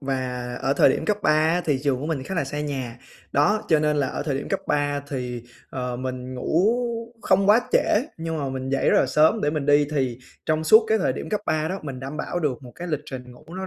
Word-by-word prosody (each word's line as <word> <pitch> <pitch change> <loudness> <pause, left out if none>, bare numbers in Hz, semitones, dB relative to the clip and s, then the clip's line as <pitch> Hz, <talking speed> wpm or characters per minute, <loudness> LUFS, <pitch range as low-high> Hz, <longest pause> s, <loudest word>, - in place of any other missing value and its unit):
và 130 -3 -3 0.2
ở 135 - +2
thời - - +5
điểm - - 0
cấp 210 -1 +1
3 - - +4
á 160 +3 +3
thì 145 -4 +1
trường 135 -3 0
của 150 - -3
mình 150 -5 -2
khá 190 - -5
là 165 -5 0
xa 145 +2 -4
nhà, 130 -5 -4 0.3
đó, 205 +10 +3
cho 160 -2 +5
nên 150 0 +1
là 140 - +1
ở - - -4
thời 145 -3 -1
điểm - - -6
cấp 195 - -1
3 145 -1 0
thì, 125 -4 -4 0.3
ờ, 125 -1 -3
mình 130 0 -5
ngủ 160 +7 +1 0.6
không 195 +1 +3
quá 215 +3 +7
trễ, - - +6 0.4
nhưng 165 -1 -3
mà 140 -2 -2
mình 130 0 -4
dậy 135 0 +2
rất - - +4
là - - +3
sớm 155 - +3
để 145 - +1
mình 150 -2 -2
đi 145 0 +5
thì 130 -5 -1 0.3
trong 155 0 +1
suốt 220 +8 +7
cái 220 0 +3
thời 190 - +1
điểm - - -6
cấp 210 - -1
3 155 0 0
đó, 190 - -3
mình 135 -3 -6
đảm 135 +3 -6
bảo 175 - -3
được 145 -5 -1
một 125 -2 -11
cái 175 - -7
lịch 150 -3 -1
trình 125 -3 -8
ngủ 125 - -17
nó 190 0 -4
145 Hz, 265 wpm, -24 LUFS, 130-160 Hz, 0.6 s, quá